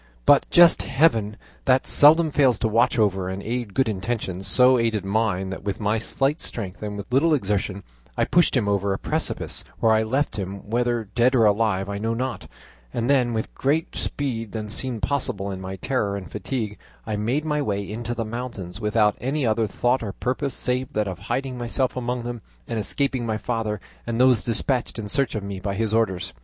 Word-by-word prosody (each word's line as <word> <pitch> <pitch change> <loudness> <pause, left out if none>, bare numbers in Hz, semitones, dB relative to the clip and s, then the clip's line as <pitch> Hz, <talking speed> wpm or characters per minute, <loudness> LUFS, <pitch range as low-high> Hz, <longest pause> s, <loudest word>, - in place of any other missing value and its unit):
"But - - +5
just 175 -1 +7
Heaven, 115 -7 +2 0.3
that 130 0 +3
seldom 155 +2 +6
fails 135 -5 +3
to - - 0
watch 115 +3 +2
over 95 -4 +1
and 95 +1 -5
aid 120 -3 -3
good 130 - +2
intentions, 100 -2 -3
so 125 0 +5
aided 110 -4 0
mine 100 -2 0
that 95 - -6
with 100 -1 -3
my 105 +1 +1
slight 135 +7 -1
strength 100 -4 -5
and 105 -1 -4
with 105 +4 -8
little 155 +4 +4
exertion 100 -4 -2 0.3
I - - +2
pushed 175 -5 +3
him 110 -5 0
over 100 -1 +1
a - - -2
precipice, - - -2 0.2
where 110 -1 +4
I 110 - +3
left 130 +5 -1
him, 95 +1 -6
whether 120 0 0
dead 125 +2 +3
or 115 -3 +5
alive 105 -2 +2
I 100 0 -4
know 115 +2 -1
not; 125 -3 -3 0.4
and 120 - 0
then, 125 -4 +3
with 110 -1 -3
greater 150 +4 0
speed 115 -7 -2
than 105 -2 -5
seemed 120 -1 -3
possible 100 -8 -1
in 95 -1 -6
my 95 0 -5
terror 100 -1 -1
and 95 - -9
fatigue, 110 -6 -4 0.3
I 110 - -2
made 120 +9 -1
my 150 -1 0
way 100 -6 -2
into 120 +3 -4
the 115 -1 -2
mountains, 110 -5 -6
without 105 0 +2
any 135 +2 -1
other 110 0 +1
thought 120 +5 0
or 100 -4 -4
purpose 130 +2 -2
save 130 +2 -1
that 105 -1 0
of 95 -2 -5
hiding 130 -1 -2
myself 120 +2 0
among 125 -1 -2
them, 120 -1 -5 0.3
and 115 - -2
escaping 130 +3 0
my 110 -2 -1
father 110 -2 -2 0.3
and 115 0 -2
those 125 -3 +5
despatched 120 +2 -1
in 105 -2 -5
search 140 +3 0
of 105 - -3
me 100 -1 -5
by 100 +1 -3
his 110 +1 -1
orders. 105 -6 0
115 Hz, 200 wpm, -24 LUFS, 105-130 Hz, 0.4 s, just